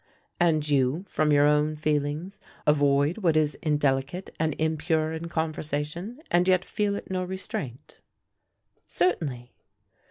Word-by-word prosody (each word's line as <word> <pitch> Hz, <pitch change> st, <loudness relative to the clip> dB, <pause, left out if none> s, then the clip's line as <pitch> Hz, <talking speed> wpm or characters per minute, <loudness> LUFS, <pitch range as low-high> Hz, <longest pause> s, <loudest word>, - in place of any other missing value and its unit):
"And 155 Hz, -4 st, +2 dB
you, 140 Hz, +3 st, +2 dB
from 155 Hz, -4 st, +1 dB
your 145 Hz, 0 st, +5 dB
own 150 Hz, +1 st, +3 dB
feelings, 150 Hz, +5 st, -2 dB, 0.3 s
avoid 145 Hz, +4 st, +3 dB
what 165 Hz, -6 st, +2 dB
is 150 Hz, -2 st, +2 dB
indelicate 145 Hz, +3 st, 0 dB
and 155 Hz, -2 st, 0 dB
impure 160 Hz, 0 st, 0 dB
in 160 Hz, +1 st, -5 dB
conversation, 160 Hz, -, -3 dB
and 175 Hz, +1 st, +3 dB
yet 185 Hz, -1 st, +3 dB
feel 205 Hz, -1 st, -1 dB
it 200 Hz, -, -7 dB
no 185 Hz, -1 st, -1 dB
restraint?" 180 Hz, -, -6 dB, 0.9 s
"Certainly." 130 Hz, -, -1 dB
155 Hz, 125 wpm, -26 LUFS, 145-175 Hz, 0.9 s, your